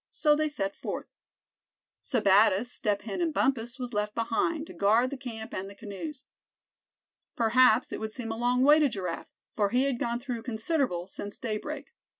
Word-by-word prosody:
So 300 -1 +3
they 310 0 +1
set 195 -9 -3
forth. - - -5 1.0
Sebattis, 210 0 +3
Step 205 -5 0
Hen 215 - -4
and 335 -2 +1
Bumpus 250 -4 0
was 250 -2 -5
left 210 0 -1
behind, 240 +8 0
to - - -11
guard 225 +6 +3
the - - -3
camp 230 -5 -7
and 190 +1 -4
the 200 - -12
canoes. 235 +8 -7 1.1
Perhaps 235 0 +4
it - - -4
would 220 0 -4
seem 230 -1 -5
a - - -2
long 245 +2 +2
way 295 +3 +7
to 295 -2 +4
Giraffe, 185 -7 -4 0.3
for 205 -2 +2
he 250 +5 +2
had 270 -3 0
gone 235 0 -1
through 245 -2 -4
considerable 225 - -1
since 200 +2 -7
daybreak. 215 -4 -4
235 Hz, 175 wpm, -29 LUFS, 210-260 Hz, 1.1 s, way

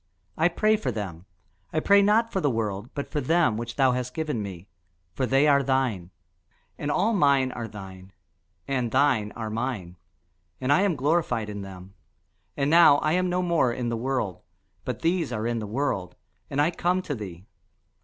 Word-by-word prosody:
I 160 - +3
pray 215 +5 +2
for 140 -12 -2
them: 95 -6 -6 0.5
I 155 - +1
pray 200 +5 +5
not 220 +3 +3
for 190 - -1
the 145 - +2
world, 110 -2 -2
but 140 - -5
for 150 - -1
them 155 -4 +2
which 115 +1 -5
thou 135 -2 +4
hast 125 0 -3
given 155 -8 -2
me; 95 -2 -7 0.5
for 130 - -1
they 135 +5 +3
are 140 -1 +5
thine. 125 -10 0 0.7
And 145 - -4
all 200 +9 +2
mine 140 -8 +3
are 120 -2 -5
thine, 95 -2 -11 0.6
and 125 -3 -1
thine 130 -5 +2
are 110 -2 -5
mine; 110 -7 -4 0.6
and 130 +2 +2
I 150 - +4
am 200 -4 +2
glorified 130 -7 0
in 105 -1 -6
them. 95 -1 -10 0.6
And 140 +1 +1
now 165 -4 +7
I 155 +1 0
am 180 +2 +1
no 180 +1 0
more 170 -8 +2
in 120 0 -3
the 115 - -1
world, 120 -5 -2 0.4
but - - -4
these 165 -2 +1
are 110 +1 -3
in 120 0 -1
the 105 - -5
world, 105 -6 -2 0.3
and 140 - -2
I 150 +4 +3
come 180 +2 0
to 150 - -3
thee. 95 -7 -8
130 Hz, 190 wpm, -26 LUFS, 110-155 Hz, 0.7 s, now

